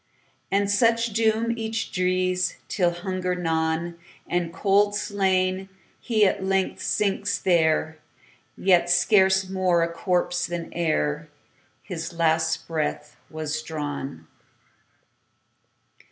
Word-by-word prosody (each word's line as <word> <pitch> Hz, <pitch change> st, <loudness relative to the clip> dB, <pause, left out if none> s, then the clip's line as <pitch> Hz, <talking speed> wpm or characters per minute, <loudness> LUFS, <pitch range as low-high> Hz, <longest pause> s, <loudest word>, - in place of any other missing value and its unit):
And 200 Hz, +1 st, +2 dB
such 230 Hz, +2 st, +2 dB
doom 225 Hz, +1 st, +1 dB
each 225 Hz, -1 st, -3 dB
drees, 185 Hz, 0 st, 0 dB
Till, 180 Hz, -4 st, +1 dB
hunger 180 Hz, +1 st, -3 dB
gnawn, 165 Hz, 0 st, -1 dB, 0.3 s
And 175 Hz, -1 st, -1 dB
cold 205 Hz, +2 st, +2 dB
slain, 190 Hz, -2 st, 0 dB, 0.3 s
he 220 Hz, -4 st, +2 dB
at 195 Hz, 0 st, 0 dB
length 190 Hz, 0 st, 0 dB
sinks 205 Hz, 0 st, 0 dB
there, 160 Hz, -3 st, +1 dB, 0.6 s
Yet 180 Hz, -2 st, +3 dB
scarce 190 Hz, +1 st, +4 dB
more 185 Hz, -3 st, +2 dB
a 170 Hz, 0 st, -2 dB
corpse 175 Hz, -1 st, 0 dB
than 170 Hz, -1 st, -5 dB
ereHis 160 Hz, +2 st, -4 dB
last 160 Hz, -1 st, +1 dB
breath 160 Hz, -2 st, -3 dB
was 155 Hz, 0 st, -3 dB
drawn. 145 Hz, -, -5 dB
180 Hz, 100 wpm, -24 LUFS, 165-195 Hz, 0.6 s, scarce